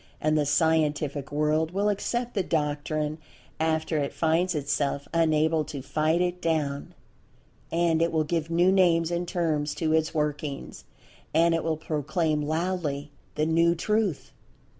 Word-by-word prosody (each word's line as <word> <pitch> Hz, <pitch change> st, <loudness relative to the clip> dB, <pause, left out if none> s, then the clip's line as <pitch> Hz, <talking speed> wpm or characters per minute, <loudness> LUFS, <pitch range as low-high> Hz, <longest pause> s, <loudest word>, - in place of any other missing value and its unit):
And 155 Hz, 0 st, +1 dB
the 150 Hz, -2 st, +1 dB
Scientific 150 Hz, -2 st, +1 dB
World 150 Hz, +2 st, +1 dB
will 200 Hz, +1 st, +1 dB
accept 240 Hz, +4 st, -1 dB
the 200 Hz, -, +1 dB
doctrine 150 Hz, -1 st, -1 dB, 0.4 s
after 160 Hz, 0 st, 0 dB
it 140 Hz, -1 st, -1 dB
finds 170 Hz, +2 st, +1 dB
itself 140 Hz, -1 st, -1 dB
unable 160 Hz, -1 st, +2 dB
to 140 Hz, -3 st, -7 dB
fight 155 Hz, +4 st, +1 dB
it 180 Hz, 0 st, -1 dB
down—and 160 Hz, +2 st, -3 dB
it 170 Hz, -, +2 dB
will 160 Hz, -1 st, +1 dB
give 165 Hz, +1 st, -2 dB
new 175 Hz, +2 st, +3 dB
names 170 Hz, -3 st, +3 dB
and 175 Hz, 0 st, -2 dB
terms 160 Hz, -5 st, -1 dB
to 160 Hz, -2 st, 0 dB
its 160 Hz, 0 st, +2 dB
workings. 150 Hz, -2 st, -3 dB, 0.5 s
And 165 Hz, +1 st, +4 dB
it 165 Hz, -, 0 dB
will 160 Hz, -1 st, -1 dB
proclaim 155 Hz, 0 st, -1 dB
loudly 155 Hz, -2 st, -2 dB, 0.2 s
the 155 Hz, -, +1 dB
"new" 165 Hz, +1 st, +3 dB
Truth. 210 Hz, -1 st, -1 dB
160 Hz, 140 wpm, -27 LUFS, 150-170 Hz, 0.5 s, And